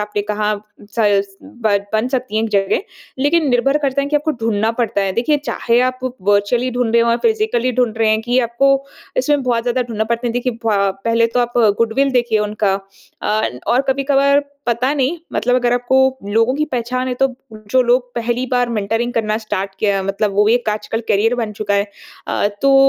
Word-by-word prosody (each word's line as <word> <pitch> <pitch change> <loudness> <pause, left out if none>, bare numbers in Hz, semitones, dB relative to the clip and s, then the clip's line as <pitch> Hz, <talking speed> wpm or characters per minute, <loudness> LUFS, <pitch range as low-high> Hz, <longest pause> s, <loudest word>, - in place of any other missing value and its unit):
आपने 210 0 -2
कहा, 210 0 0 0.4
सस 200 -3 +1
ब 235 -8 -1 0.2
बन 220 +3 +1
सकती 255 -4 -2
है 220 - +2
एक 225 - -2
जगह, 195 - +1 0.4
लेकिन 295 +2 +2
निर्भर 270 +4 +2
करता 275 -1 +1
है - - -2
कि 300 - +2
आपको 300 +2 0
ढूँढ़ना 220 -1 +1
पड़ता 225 -3 0
है। 195 -1 0
देखिए, 245 +8 +1
चाहे 235 +1 +1
आप 255 0 0 0.2
वर्चुअली 205 +5 +2
ढूँढ़ 245 -2 -1
रहे 235 0 +5
हो 235 - +2
या 235 - +3
फिजिकली 430 - +1
ढूँढ़ 245 -2 +1
रहे 225 - +3
हैं 215 - +2
कि, 245 +2 +1
आपको 275 +3 +1 0.3
इसमें 295 - +1
बहुत 240 -2 0
ज़्यादा 250 +1 0
ढूँढ़ना 225 -3 -3
पड़ता 235 +2 -2
है। 235 - -1
देखिए 245 +1 -1
भा 200 -3 +2
पहले 230 0 +3
तो - - +4
आप 240 0 -1 0.3
गुडविल 230 +5 +2
देखिए 240 -3 +2
उनका 210 -2 0 0.5
अ, 215 +1 0 0.2
और 250 +3 +3
कभी-कभार 275 +1 +3 0.3
पता 245 +3 +1
नहीं 285 +4 0
मतलब 245 +2 +1
अगर 245 -1 +1
आपको 265 +2 +2
लोगों 230 +4 +3
की 305 +2 0
पहचान 255 +1 -2
है, 250 - -1
तो 265 0 0 0.2
जो 215 +4 0
लोग 245 0 +1
पहली 240 +2 -1
बार 245 -1 +2
मेंटरिंग 225 +2 -1
करना 215 -1 0
स्टार्ट 200 -3 -4
किया 200 -2 +1
मतलब 195 +2 -1
वो 210 +1 +3
एक 240 0 +2
आजकल 215 +1 -3
करियर 215 +4 +2
बन 225 -3 -3
चुका 205 -1 -2
है। 200 0 +2 0.4
अ, - - +1 0.2
तो 275 0 +5
235 Hz, 200 wpm, -18 LUFS, 215-255 Hz, 0.5 s, रहे